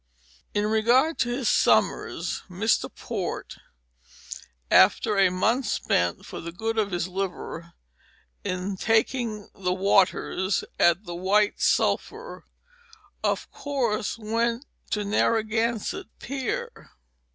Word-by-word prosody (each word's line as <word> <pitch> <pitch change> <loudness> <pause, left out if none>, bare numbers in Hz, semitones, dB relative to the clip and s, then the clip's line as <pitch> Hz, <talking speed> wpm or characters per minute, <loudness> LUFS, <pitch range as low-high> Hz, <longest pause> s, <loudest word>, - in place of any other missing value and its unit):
In 205 0 +2
regard 240 +9 +3
to 240 - +1
his 245 -1 -1
summers, - - +2
Mr. 200 +5 +1
Port - - -5 1.1
after 210 - +5
a 195 -2 +5
month 220 +7 +1
spent 85 - 0
for - - -7
the 170 - -6
good 225 +5 -2
of 205 -2 +1
his 175 -2 -2
liver 180 -2 -5 0.7
in 185 +2 -3
taking 225 0 0
the 180 -2 -1
waters 190 -1 +2 0.2
at 175 +3 +4
the 175 - -7
White 200 +4 +1
Sulphur 460 +3 0 0.8
of - - -1
course 240 -7 -2
went 230 +3 -1 0.2
to 210 -1 -1
Narragan 225 +2 +1
sett - - -5
Pier. 265 -1 -4
210 Hz, 110 wpm, -26 LUFS, 185-230 Hz, 1.1 s, after